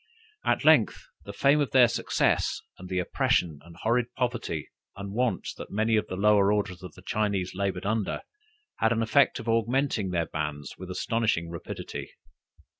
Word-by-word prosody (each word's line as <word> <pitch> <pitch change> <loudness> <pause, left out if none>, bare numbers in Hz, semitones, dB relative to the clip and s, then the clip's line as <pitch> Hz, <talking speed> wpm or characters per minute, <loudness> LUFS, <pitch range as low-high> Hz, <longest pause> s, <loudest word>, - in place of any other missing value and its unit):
At - - +1
length - - +4 0.2
the - - -6
fame 140 +2 +3
of 140 - 0
their 125 -2 +7
success, 120 - +1 0.2
and 90 0 -9
the 90 - -2
oppression 85 -3 +1
and 85 +1 -14
horrid 120 +6 0
poverty 120 - -2 0.2
and 100 0 -7
want 115 -5 0
that - - -7
many 110 +2 +1
of 105 -1 +1
the 95 - -4
lower 100 0 +4
orders 100 -4 -1
of 90 0 -10
Chinese 100 -4 -1
labored 95 -1 -2
under, 110 -1 -1 0.5
had 110 - +3
the 115 - +1
effect 140 +5 +3
of 115 -3 -8
augmenting 115 -2 +1
their 85 -2 0
bands 75 -3 -4
with 95 0 -9
astonishing 90 -3 0
rapidity. 85 - -6
105 Hz, 165 wpm, -27 LUFS, 90-115 Hz, 0.5 s, their